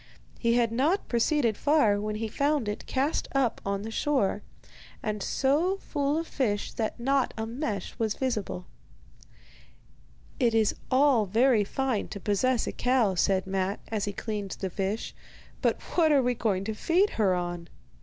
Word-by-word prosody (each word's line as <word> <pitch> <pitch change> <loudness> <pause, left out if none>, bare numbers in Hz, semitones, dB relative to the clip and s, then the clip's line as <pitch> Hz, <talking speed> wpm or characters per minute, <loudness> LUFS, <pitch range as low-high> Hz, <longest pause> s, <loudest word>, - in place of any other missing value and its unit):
He 235 0 +2
had 235 -2 +2
not 295 - +1
proceeded 235 -1 +2
far 285 -9 +3
when 210 0 -3
he 220 +1 -2
found 280 +1 0
it 210 - -4
cast 275 +4 0
up 265 -4 +1
on 200 0 -2
the 225 - -5
shore, 220 -6 0 0.6
and 210 -2 -2
so 305 - +1
full 290 -5 -1
of 330 - -2
fish 215 -10 -1
that 225 +1 -3
not 270 +2 +1
a 220 - -2
mesh 225 - -4
was 220 -2 0
visible. 215 -8 -2 1.7
'It 235 -4 +3
is 220 -2 +3 0.2
all 260 -5 +4
very 230 +2 +4
fine 255 +1 -1
to 200 - -7
possess 225 +5 +1
a - - -3
cow,' 245 -6 +2
said 190 +1 +1
Matte, 190 +1 -2
as 215 -3 -1
he 205 - -2
cleaned 205 -1 -4
the 190 -2 -3
fish; 200 +4 -3 0.5
'but - - +1 0.2
what 320 -3 +4
are 280 -3 +4
we 245 0 +2
going 205 -5 0
to 220 +2 -3
feed 355 - +2
her 190 -3 +3
on? 175 -1 -4
225 Hz, 165 wpm, -28 LUFS, 205-270 Hz, 1.7 s, all